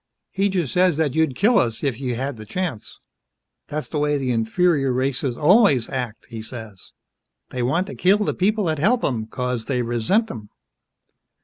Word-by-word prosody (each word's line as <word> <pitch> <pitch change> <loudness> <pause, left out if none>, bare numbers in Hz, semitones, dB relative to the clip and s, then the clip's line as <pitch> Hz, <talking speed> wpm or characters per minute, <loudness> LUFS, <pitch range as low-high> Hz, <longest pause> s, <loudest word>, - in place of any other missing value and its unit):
He 195 +1 +1
just 175 -8 -1
says 180 -3 +3
that 155 -5 +1
you'd 160 -4 +1
kill 220 - +4
us 115 -1 -1
if 135 -6 -1
you 125 -3 -2
had 135 +3 -3
th' 110 -1 -10
chance. 175 - -4 0.7
That's 150 +1 -4
the 150 - -3
way 150 0 +1
the 130 -2 -1
inferior 135 +5 +1
races 130 0 -1
always 155 - +4
act, 125 -4 -4
he 115 -2 -7
says. 110 -4 -9 0.6
They 125 - -3
want 160 +10 +1
to 200 - -8
kill 190 +3 +3
th' - - -1
people 210 +3 +1
that 160 -4 -1
help 230 - +2
'em, 110 -5 -1
'cause 125 -1 -3
they 125 -2 -1
resent 120 - +1
'em." 105 -3 -9
135 Hz, 185 wpm, -22 LUFS, 120-180 Hz, 0.7 s, kill